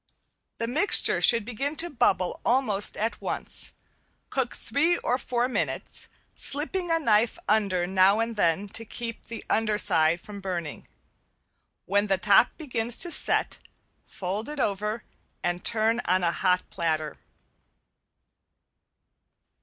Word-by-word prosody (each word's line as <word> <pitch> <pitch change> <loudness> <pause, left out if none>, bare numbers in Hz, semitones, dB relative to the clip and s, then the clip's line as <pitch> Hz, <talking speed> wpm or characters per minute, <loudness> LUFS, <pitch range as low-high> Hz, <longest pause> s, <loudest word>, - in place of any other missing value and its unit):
The 230 - -1
mixture 300 - +4
should 230 -3 +4
begin 270 +6 -3
to 340 - +2
bubble 190 - 0
almost 225 -5 +1
at 225 +2 -3
once; - - -4 0.6
cook 265 -3 -2
three 315 +8 0
or 250 +2 -1
four 245 -1 -1
minutes, 255 - -4 0.3
slipping 340 +5 0
a 330 - +2
knife 225 -6 +1
under 200 -4 +1
now 190 +3 +3
and 230 0 -2
then 190 0 +1
to 225 - -2
keep 230 +1 -7
the 230 - -7
under 215 -1 0
side 160 -3 +2
from 200 +2 -10
burning. 175 -5 -6 1.0
When 205 +2 +1
the 195 -1 +1
top 205 +4 +4
begins 240 -6 -1
to 350 - +5
set, - - +3 0.4
fold 205 +4 -5
it 300 -1 -6
over 210 0 -2 0.4
and 175 0 -2
turn 225 +1 +1
on 185 +1 +1
a 170 - +2
hot 180 0 0
platter. 155 -2 -2
215 Hz, 130 wpm, -26 LUFS, 190-245 Hz, 1.0 s, to